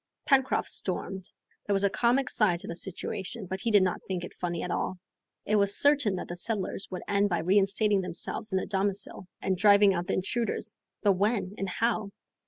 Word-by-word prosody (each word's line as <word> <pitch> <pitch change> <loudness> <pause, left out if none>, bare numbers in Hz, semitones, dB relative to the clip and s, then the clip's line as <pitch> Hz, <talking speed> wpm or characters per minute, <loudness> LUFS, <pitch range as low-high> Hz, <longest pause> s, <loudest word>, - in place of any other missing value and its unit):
Pencroft 265 -2 +2
stormed. 190 0 -3 0.4
There 200 - +2
was 195 - +2
a 200 - +4
comic 250 +4 +2
side 190 -6 +2
to - - -9
the 170 - -5
situation, 195 +4 -4
but 190 +1 -5
he 235 - 0
did 205 -3 +5
not 185 -2 -1
think 185 -2 -3
it - - -8
funny 175 -2 -3
at 180 - -3
all. 185 - -2 0.5
It 215 - +2
was 200 -1 +2
certain 285 -9 +3
that - - -5
the 175 - -5
settlers 195 +1 -2
would 180 - -6
end 205 0 +2
by 175 - +1
reinstating 195 +3 +3
themselves 180 +4 -3
in 190 - +1
their - - -1
domicile 195 -1 -2 0.2
and 190 - +1
driving 200 +1 +6
out 175 0 -3
the - - 0
intruders, 215 +2 -2 0.3
but 200 - +5
when 200 0 0
and 195 -2 -3
how? 220 0 0
195 Hz, 200 wpm, -28 LUFS, 185-210 Hz, 0.5 s, driving